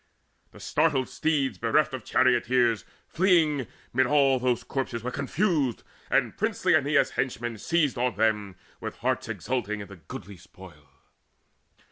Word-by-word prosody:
The - - -16
startled 130 -1 +1
steeds, 145 -4 0
bereft 125 +6 +2
of 130 -4 -5
charioteers, 120 -2 +2 0.2
Fleeing, 160 - +2 0.3
mid 130 +1 +3
all 135 -2 +4
those 125 -1 0
corpses 125 -4 -3
were 125 - -3
confused, 140 - 0 0.3
And - - +1
princely - - +1
Aeneas' - - +3
henchmen 115 -1 -3
seized 150 -5 +1
on 125 -3 0
them 105 -2 0 0.2
With - - -6
hearts - - -2
exulting 105 -5 -3
in 100 - -7
the 100 - -11
goodly 90 +4 -10
spoil. 90 -5 -16
125 Hz, 135 wpm, -27 LUFS, 110-140 Hz, 0.3 s, all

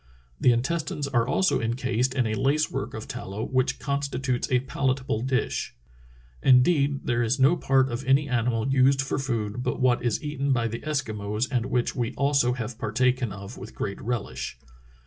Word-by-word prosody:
The 125 - +5
intestines 140 +3 -1
are 120 -4 +1
also 190 +7 +2
encased 125 +2 0
in 130 -3 +2
a 110 - -1
lace 140 +6 +1
work - - -4
of - - -7
tallow 100 +3 -5
which 130 -1 0
constitutes 140 -3 -2
a 125 -1 +3
palatable 130 -2 -1
dish. 130 +1 -1 0.7
Indeed, 140 +2 +4
there 120 -1 0
is 120 +2 +1
no 135 +6 +5
part 135 -5 +2
of 120 +3 -3
any 135 +2 +3
animal 120 -2 0
used 135 0 +3
for 135 - -2
food 120 -4 -2
but - - -2
what 125 -2 +3
is 120 +2 0
eaten 140 -2 0
by 120 -2 +1
the 115 - -4
Eskimos 110 -6 -2
and 125 -2 0
which 125 -1 0
we 120 -2 -2
also 140 -3 +2
have 115 -2 -5
partaken 125 +2 +1
of 100 +3 -9
with - - -10
great 100 - -4
relish. 115 - -4
130 Hz, 175 wpm, -26 LUFS, 115-135 Hz, 0.7 s, The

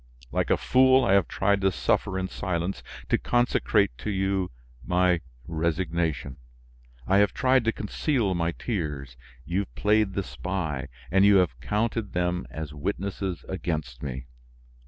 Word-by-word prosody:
Like - - 0
a - - +4
fool, 130 0 +5
I 95 - +3
have 100 -4 +4
tried 100 +1 +1
to 95 0 +3
suffer 95 +1 0
in 95 0 -1
silence, 90 0 -3 0.3
to - - +3
consecrate 120 - +2
to - - -4
you 95 -1 0 0.3
my 90 -1 +2 0.2
resignation; 80 -4 -1 0.7
I 95 - +3
have 105 -1 +3
tried 130 -3 +3
to 115 - +3
conceal 110 -1 -1
my 85 -1 0
tears; 75 - -4 0.3
you 90 +3 -1
have 100 - -5
played 105 -1 +2
the 100 - -1
spy, 75 0 -3 0.2
and 95 +2 +5
you 100 0 +7
have 90 -10 +2
counted 105 - -1
them 90 0 -1
as 80 -2 -6
witnesses 95 +3 -3
against 75 -9 -3
me. 65 -3 -5
95 Hz, 150 wpm, -26 LUFS, 80-100 Hz, 0.7 s, you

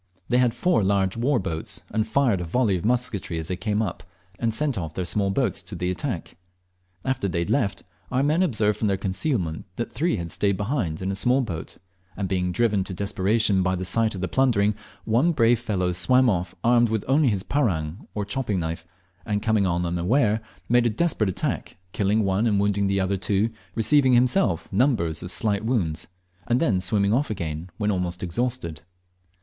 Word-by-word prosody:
They 125 +1 +3
had 125 -2 +2
four 180 - +2
large 95 -1 +1
war 125 +4 +1
boats, 80 -6 -3
and 110 0 0
fired 125 -10 +2
a - - -2
volley 105 +4 +1
of 90 - -3
musketry 115 -7 -1
as 80 0 -4
they 90 - -1
came 105 +3 -1
up, 105 - -4 0.4
and 115 -1 +1
sent 140 +4 0
off 80 -5 -5
their 90 - -2
small 100 +3 +1
boats 100 -2 0
to 90 +2 -7
the 90 +1 -1
attack. 90 - -4 0.7
After 130 -6 0
they 85 - -2
had 85 -1 -1
left, 100 -8 0 0.3
our 130 +1 +2
men 155 +5 +2
observed 110 - +1
from 110 - +1
their 100 -1 +1
concealment 95 - -2
that 120 - -4
three 165 +7 0
had 85 -4 -5
stayed 100 +2 0
behind 100 - -2
with 95 +1 -1
a - - -3
small 125 +7 +2
boat; 85 -10 -5 0.4
and 100 -1 -1
being 90 -1 0
driven 105 -2 +1
to 95 - -6
desperation 100 +1 +1
by 95 0 +1
the 95 0 -4
sight 110 +3 +1
of 95 - -5
the 95 - -1
plundering, 110 -5 +2 0.3
one 125 +10 +3
brave 115 -4 +3
fellow 95 -6 -1
swam 125 +8 +3
off 90 -2 -2
armed 120 0 +4 0.2
only 140 +4 +3
with - - +3
his 95 -2 -1
parang, 90 - -1
or 105 -1 -2
chopping 105 -2 -2
knife, 80 0 -3 0.4
and 105 -1 -2
coming 110 -4 +2
on 85 0 0
them 85 0 -1
unawares 110 +4 +2 0.3
made 120 0 +4
a - - +2
desperate 110 - 0
attack, 95 - -3
killing 105 +3 +1
one 100 +4 +1
and 105 -3 +2
wounding 100 0 +1
the 100 0 +1
other 95 +1 0
two, 100 +4 0 0.2
receiving 130 +3 +4
himself 125 +10 +2
numbers 95 - +1
of 90 - -5
slight 100 +2 0
wounds, 100 -10 -1 0.4
and 120 +1 +2
then 105 - +2
swimming 100 +2 +1
off 135 +3 +1
again 85 -4 -4
when 105 -1 0
almost 90 -2 -2
exhausted. 90 - -2
105 Hz, 200 wpm, -24 LUFS, 95-120 Hz, 0.7 s, armed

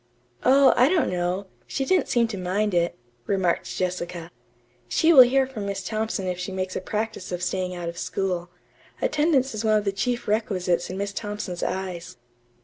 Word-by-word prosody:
"Oh, 270 +1 +6
I 250 +3 +5
don't 340 - +2
know. 180 +2 -1 0.2
She 270 - -2
didn't 370 +5 +2
seem 235 -1 +2
to 215 - -4
mind 195 +3 -1
it," 170 0 +1 0.3
remarked 190 -3 +1
Jessica. 175 -2 -3 0.6
"She 325 - +4
will 270 - +11
hear 265 +2 +5
from 225 -6 -6
Miss 195 -1 -3
Thompson 215 -1 -2
if 180 -1 -2
she 180 +2 -4
makes 185 0 -3
a - - -2
practice 215 -1 -4
of 180 0 -3
staying 180 0 -2
out 175 -1 -5
of 170 0 -5
school. 180 -2 -2 0.5
Attendance 295 -4 +2
is 215 +1 -3
one 215 -1 +4
of 210 - -2
the 200 - +1
chief 240 +5 -2
requisites 185 -5 0
in 185 - -5
Miss 200 0 -3
Thompson's 205 -5 -5
eyes." 180 -6 -4
195 Hz, 185 wpm, -25 LUFS, 180-230 Hz, 0.6 s, will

